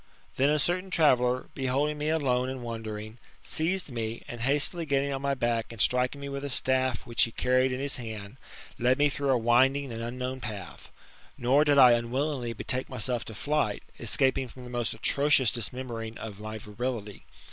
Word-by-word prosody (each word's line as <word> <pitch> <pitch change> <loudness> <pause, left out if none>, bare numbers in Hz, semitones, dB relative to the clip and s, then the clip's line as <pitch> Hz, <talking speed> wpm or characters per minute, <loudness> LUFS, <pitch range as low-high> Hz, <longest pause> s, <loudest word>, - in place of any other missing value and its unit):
Then 135 +2 +3
a 150 - +3
certain 180 +5 0
traveller, 130 -7 +3
beholding 140 +3 0
me 150 +1 -1
alone 130 -5 +1
and 130 -2 -5
wandering, 110 -1 -6 0.2
seized 170 0 -1
me, 115 -1 -4
and 120 -1 -7
hastily 145 +6 +2
getting 140 -2 0
on 135 - -3
my 140 0 0
back, 120 -3 -1
and 115 - -10
striking 125 +6 +2
me 140 - -6
with 140 0 -5
a 145 - -3
staff 130 -2 +1
which 120 0 0
he 115 - +3
carried 130 +2 +2
in 125 - -2
his 140 +1 -2
hand, 110 -2 -7 0.4
led 125 +1 +3
me 145 0 +4
through 140 0 -2
a 130 - +4
winding 130 +4 +3
and 115 - -5
unknown 125 +2 -4
path. 105 -6 -7 0.5
Nor 135 +5 +3
did 145 -1 +4
I 125 -3 +9
unwillingly 120 +1 0
betake 125 +4 -2
myself 125 -1 -2
to 110 - -8
flight, 145 -4 -1 0.2
escaping 130 +3 +1
from 125 +1 -12
the 125 - -9
most 120 -2 -1
atrocious 140 -4 +3
dismembering 115 -1 -4
of 105 -3 -8
my 110 +1 -6
virility. 105 0 -5
125 Hz, 185 wpm, -28 LUFS, 115-140 Hz, 0.5 s, I